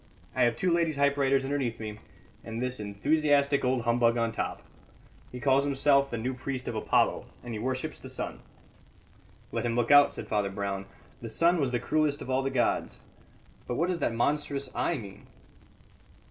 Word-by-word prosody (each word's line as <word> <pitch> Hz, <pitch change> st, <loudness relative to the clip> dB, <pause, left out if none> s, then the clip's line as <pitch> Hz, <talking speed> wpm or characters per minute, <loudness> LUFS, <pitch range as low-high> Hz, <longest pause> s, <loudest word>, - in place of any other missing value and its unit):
I 130 Hz, -, +1 dB
have 120 Hz, -1 st, +2 dB
two 180 Hz, +7 st, +1 dB
lady 170 Hz, -2 st, +2 dB
typewriters 140 Hz, -1 st, +2 dB
underneath 135 Hz, -4 st, -2 dB
me, 105 Hz, -1 st, -6 dB, 0.4 s
and 115 Hz, 0 st, -5 dB
this 125 Hz, 0 st, -2 dB
enthusiastic 140 Hz, +7 st, +2 dB
old 125 Hz, -1 st, +1 dB
humbug 120 Hz, 0 st, +3 dB
on 115 Hz, -1 st, +1 dB
top. -, -, -4 dB, 0.7 s
He 125 Hz, -, -7 dB
calls 135 Hz, 0 st, +3 dB
himself 140 Hz, 0 st, +3 dB
the 120 Hz, -, -3 dB
New 125 Hz, +4 st, -2 dB
Priest 130 Hz, 0 st, -5 dB
of -, -, -2 dB
Apollo, 110 Hz, -, +1 dB, 0.2 s
and 120 Hz, -1 st, -6 dB
he 110 Hz, -, -4 dB
worships 130 Hz, +3 st, -3 dB
the -, -, -9 dB
sun." -, -, -4 dB, 1.1 s
"Let -, -, -2 dB
him 120 Hz, -1 st, -1 dB
look 120 Hz, +2 st, +1 dB
out," 145 Hz, 0 st, +7 dB
said -, -, -6 dB
Father 105 Hz, -2 st, 0 dB
Brown. 100 Hz, 0 st, -4 dB, 0.3 s
"The 115 Hz, -, -6 dB
sun 165 Hz, +9 st, +3 dB
was 135 Hz, -, +1 dB
the 120 Hz, -1 st, -1 dB
cruellest 150 Hz, +3 st, +1 dB
of 130 Hz, -, -5 dB
all 130 Hz, +1 st, +2 dB
the 135 Hz, -, -1 dB
gods. -, -, 0 dB, 0.7 s
But 120 Hz, -, -2 dB
what 170 Hz, +7 st, +1 dB
does 180 Hz, -2 st, -1 dB
that -, -, +1 dB
monstrous 140 Hz, +1 st, -1 dB
eye -, -, 0 dB
mean?" 100 Hz, -3 st, -10 dB
130 Hz, 185 wpm, -29 LUFS, 115-140 Hz, 1.1 s, out